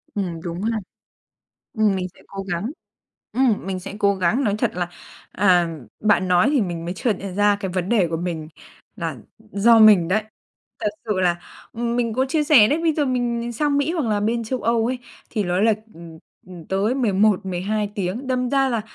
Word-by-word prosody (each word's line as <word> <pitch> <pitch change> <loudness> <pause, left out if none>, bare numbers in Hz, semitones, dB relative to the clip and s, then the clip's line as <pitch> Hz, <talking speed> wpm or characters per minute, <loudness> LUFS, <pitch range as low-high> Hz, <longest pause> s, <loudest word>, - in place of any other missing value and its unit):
Ừm, 175 -5 -3
đúng 170 +1 -5
ha, 225 +2 0 1.0
ừm, 210 -3 +3
mình 185 -1 -2
sẽ - - -19
cố 195 0 -6
gắng, 195 +6 -3 0.6
ừm, 245 -7 +1
mình 190 -1 -3
sẽ 195 - -8
cố 200 -1 +3
gắng. 190 +9 +1
Nói 205 -3 +1
thật 235 -1 +1
là, 175 -1 -2 0.4
à, 180 -4 +3 0.3
bạn 185 -4 +2
nói 180 +9 +4
thì 280 - +3
mình 170 -4 -3
mới 175 - -4
chợt 220 +4 0
nhận 195 -2 -6
ra 205 0 +3
cái 190 - -3
vấn 185 -1 -1
đề 200 -7 +3
của 165 - -2
mình 160 -2 -4 0.5
là 165 -4 -4 0.2
do 220 +1 +3
mình 210 -6 +7
đấy. 210 +4 +2 0.6
Thật - - +1 0.2
sự 210 -4 -1
là, 175 -2 +2 0.4
ừm, 235 +1 -2
mình 230 -2 0
có 260 +2 +2
chia 305 +2 0
sẻ 265 -8 +6
đấy, 295 - +1
bây 325 -2 +3
giờ 295 -1 +1
mình 245 -2 -1
mình 235 0 -4
sang 285 +4 +1
Mỹ 295 +4 0
hoặc 320 -7 -1
là 210 -1 +1
bên 230 +2 0
Châu 255 +3 -3
Âu 230 -1 +2
ấy, 250 +1 -2 0.3
thì 215 -4 -1
nó 180 +1 0
là, 220 0 +4 0.2
ừm, 165 -1 -12 0.3
ừm, 175 -3 -11
tới 200 +5 0
11-12 205 -3 +1
tiếng, 200 +7 -3
đâm 250 -1 -1
ra 270 -1 +3
là 235 -3 0
210 Hz, 210 wpm, -22 LUFS, 185-235 Hz, 1.0 s, mình